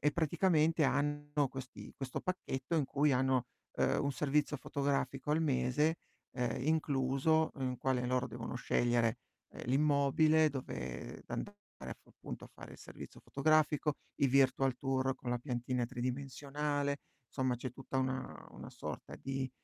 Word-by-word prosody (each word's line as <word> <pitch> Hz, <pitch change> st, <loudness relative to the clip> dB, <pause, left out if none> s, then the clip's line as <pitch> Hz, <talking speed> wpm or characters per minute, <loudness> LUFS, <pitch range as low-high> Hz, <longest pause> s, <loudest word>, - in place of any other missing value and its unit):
e 150 Hz, -, +4 dB
praticamente 160 Hz, 0 st, +3 dB
hanno 145 Hz, +1 st, +1 dB
questi 130 Hz, -1 st, -8 dB
questo 135 Hz, -2 st, -4 dB
pacchetto 170 Hz, -5 st, -3 dB
in 150 Hz, -, +3 dB
cui 140 Hz, +2 st, +2 dB
hanno, 130 Hz, -1 st, +2 dB, 0.3 s
uhm, -, -, +2 dB
1 140 Hz, -, +1 dB
servizio 150 Hz, +1 st, +1 dB
fotografico 140 Hz, 0 st, -1 dB
al 155 Hz, +2 st, +3 dB
mese, 150 Hz, +3 st, +2 dB, 0.4 s
uhm, 125 Hz, -1 st, 0 dB
incluso, 155 Hz, 0 st, +2 dB
in 130 Hz, -2 st, -2 dB
quale 125 Hz, -2 st, +1 dB
loro 125 Hz, 0 st, +1 dB
devono 120 Hz, -, -6 dB
scegliere, 120 Hz, -2 st, +2 dB, 0.4 s
uhm, -, -, -8 dB
l'immobile, 150 Hz, +3 st, +4 dB
dove 65 Hz, -, -5 dB
d -, -, -26 dB
andare 205 Hz, -, -4 dB, 0.3 s
a -, -, -4 dB
f -, -, -17 dB
appunto, -, -, -8 dB
a -, -, -12 dB
fare -, -, -11 dB
il -, -, -12 dB
servizio -, -, -10 dB
fotografico, 150 Hz, +1 st, +2 dB, 0.3 s
i 140 Hz, -, +6 dB
virtual 135 Hz, 0 st, +4 dB
tour 135 Hz, 0 st, 0 dB
con 125 Hz, -, -5 dB
la 120 Hz, -, +1 dB
piantina 125 Hz, -1 st, -1 dB
tridimensionale, 140 Hz, +3 st, -2 dB, 0.3 s
insomma, 130 Hz, -2 st, 0 dB
c'è 125 Hz, +1 st, -4 dB
tutta 135 Hz, 0 st, -4 dB
una 130 Hz, 0 st, -2 dB
una -, -, -9 dB
sorta -, -, -7 dB
di 135 Hz, -1 st, -3 dB
135 Hz, 150 wpm, -34 LUFS, 130-150 Hz, 0.4 s, i